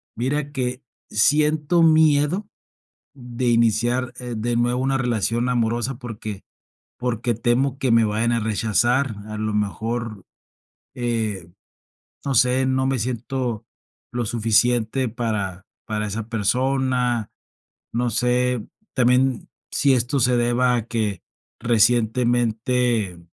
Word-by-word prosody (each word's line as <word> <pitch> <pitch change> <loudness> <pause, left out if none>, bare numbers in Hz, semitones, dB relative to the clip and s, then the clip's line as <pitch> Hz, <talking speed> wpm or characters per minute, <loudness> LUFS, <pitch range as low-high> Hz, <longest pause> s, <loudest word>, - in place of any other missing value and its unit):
mira, 140 +4 -2
que 125 -1 -3 0.3
siento 150 +8 +2
miedo 160 +3 +4 0.7
de 125 -1 -3
iniciar, 120 +2 +2
eh, 125 -1 -5
de 120 +2 -1
nuevo 120 +1 +1
una 135 0 +1
relación 120 -1 0
amorosa, 120 +1 0
porque 110 -5 -7 0.5
porque 120 -1 -1
temo 120 +4 +1
que 135 -2 0
me 115 0 +5
vayan 110 +3 0
a 115 - +1
rechazar. 115 +3 +1
A 110 - -5
lo 110 0 -2
mejor, 110 +1 -3 0.7
eh, 110 -7 -2 0.8
no 140 - -1
sé, 125 +2 +3
no 130 0 +1
me 135 -1 0
siento 120 -1 -3 0.5
lo 120 0 -1
suficiente 120 +2 +1
para 105 -5 -3 0.2
para 105 -1 -2
esa 105 +2 -5
persona. 125 +1 0 0.6
No 120 +1 0
sé, 125 0 0 0.3
también 125 0 +2 0.2
si 140 0 +2
esto 125 +3 0
se 125 +1 +3
deba 120 +1 +2
a 115 -2 -3
que 105 -6 -2 0.4
recientemente 120 -2 +1
120 Hz, 115 wpm, -22 LUFS, 110-130 Hz, 0.8 s, me